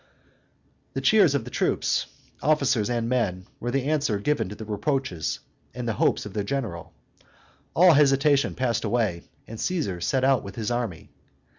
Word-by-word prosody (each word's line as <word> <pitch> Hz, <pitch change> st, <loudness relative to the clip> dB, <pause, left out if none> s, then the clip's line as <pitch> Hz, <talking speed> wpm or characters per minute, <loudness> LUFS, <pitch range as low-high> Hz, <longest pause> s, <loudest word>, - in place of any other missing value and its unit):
The -, -, -2 dB
cheers 195 Hz, -, +5 dB
of 135 Hz, -, 0 dB
the 125 Hz, -, -8 dB
troops, -, -, 0 dB, 0.3 s
officers 130 Hz, -7 st, +2 dB
and 120 Hz, -1 st, -1 dB
men, 105 Hz, -7 st, -1 dB
were 120 Hz, -, -3 dB
the 135 Hz, +1 st, 0 dB
answer 145 Hz, -7 st, 0 dB
given 115 Hz, -2 st, 0 dB
to 105 Hz, -, -7 dB
the 110 Hz, -, -8 dB
reproaches 110 Hz, -, -2 dB, 0.3 s
and 125 Hz, -1 st, -4 dB
hopes 110 Hz, -1 st, +1 dB
of 105 Hz, -, -8 dB
their 105 Hz, -, -1 dB
general: 110 Hz, -8 st, -4 dB, 0.8 s
all 175 Hz, 0 st, +7 dB
hesitation 140 Hz, 0 st, +3 dB
passed 125 Hz, -2 st, 0 dB
away; 110 Hz, -8 st, 0 dB, 0.2 s
and 110 Hz, 0 st, -9 dB
Caesar 140 Hz, -, -2 dB
set 130 Hz, +7 st, 0 dB
out 135 Hz, -2 st, +4 dB
with 100 Hz, 0 st, -9 dB
his 115 Hz, +1 st, -3 dB
army. 120 Hz, -9 st, -3 dB
120 Hz, 160 wpm, -25 LUFS, 105-140 Hz, 0.8 s, all